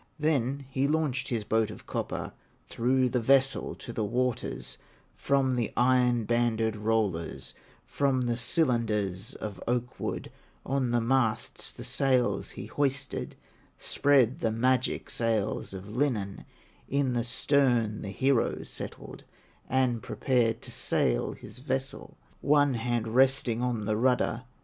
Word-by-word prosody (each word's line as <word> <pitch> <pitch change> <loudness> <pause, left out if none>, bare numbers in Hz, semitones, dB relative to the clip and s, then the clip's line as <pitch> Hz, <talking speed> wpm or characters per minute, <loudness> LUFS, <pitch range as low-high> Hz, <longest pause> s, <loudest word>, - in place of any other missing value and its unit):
Then 140 -3 0
he 135 +1 0
launched 150 -4 0
his 115 -4 -1
boat 110 +1 +1
of 105 - -10
copper, - - -4 0.3
Threw 130 +2 +1
the 125 0 0
vessel 135 +3 +2
to 120 - -8
the 110 - -1
waters, 125 +3 -2 0.4
From 135 -2 +1
the 120 -3 -1
iron 125 -1 +3
banded 115 -1 +1
rollers, 105 -6 -1 0.3
From 135 -2 +1
the 120 -1 0
cylinders 115 - 0
of 100 -4 -6
oak 125 0 -1
wood, - - -4 0.3
On 135 -2 0
the 120 0 +2
masts 120 -2 0
the - - -9
sails 130 -3 +1
he - - -5
hoisted, 140 -1 -2 0.4
Spread 135 -4 +2
the 115 - +1
magic 125 +3 +1
sails 110 -3 -1
of 100 +2 -8
linen, 115 -8 -1 0.4
In 140 -2 +1
the 120 -1 0
stern 120 -3 +2
the 100 - -5
hero 130 +4 +1
settled - - -8 0.5
And 125 -3 +1
prepared 115 -3 0
to - - -6
sail - - +1
his - - -11
vessel, 135 0 -4 0.2
One 145 -1 +4
hand 120 -1 -1
resting 130 -1 +3
on 120 -4 -1
the 105 0 0
rudder. 125 0 +1
120 Hz, 135 wpm, -28 LUFS, 110-130 Hz, 0.5 s, One